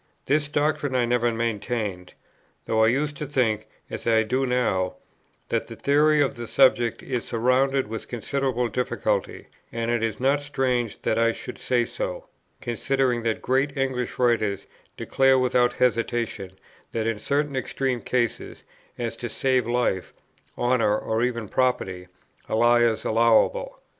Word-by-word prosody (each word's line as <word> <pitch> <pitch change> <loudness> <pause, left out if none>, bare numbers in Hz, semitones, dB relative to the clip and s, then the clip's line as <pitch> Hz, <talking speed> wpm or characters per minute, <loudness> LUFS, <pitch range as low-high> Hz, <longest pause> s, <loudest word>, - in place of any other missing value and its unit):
This 145 +1 +1
doctrine 145 -2 0
I 125 -1 +3
never 120 0 +1
maintained, 110 -4 -3 0.5
though 110 0 +2
I - - +5
used 145 +5 0
to 150 - -5
think, 115 -6 0 0.2
as - - -7
I 110 -1 +4
do 130 +4 0
now, 95 -8 0 0.5
that - - -1
the - - -9
theory 150 +1 +3
of 140 - +1
the 120 -1 -7
subject 120 -3 +3
is 125 -3 -3
surrounded 130 +3 +1
with 110 +1 -7
considerable 125 0 -1
difficulty; 125 +3 -2 0.3
and 115 0 -2
it 120 -1 0
is 115 -1 -2
not 135 +3 +2
strange 130 -6 -1
that 110 - +1
I 115 0 +3
should 125 - -8
say 120 -2 +1
so, - - -5 0.4
considering 125 +1 0
that 115 -1 -2
great 135 +3 0
English 130 -2 -2
writers 110 -5 +1 0.3
declare 135 0 +3
without 125 -1 +2
hesitation 115 -5 -1 0.4
that 110 -1 -1
in 115 -2 -1
certain 140 +4 -1
extreme 130 -1 -2
cases, 120 -3 -2 0.3
as 115 -1 -3
to 120 - -5
save 130 0 +1
life, 120 -6 -1 0.4
honour, 120 -4 +2
or 110 +1 -2
even 120 -3 -1
property, 95 -8 -1 0.4
a - - 0
lie 120 +1 +4
is 115 -2 +1
allowable. 115 - +2
120 Hz, 150 wpm, -25 LUFS, 115-135 Hz, 0.5 s, I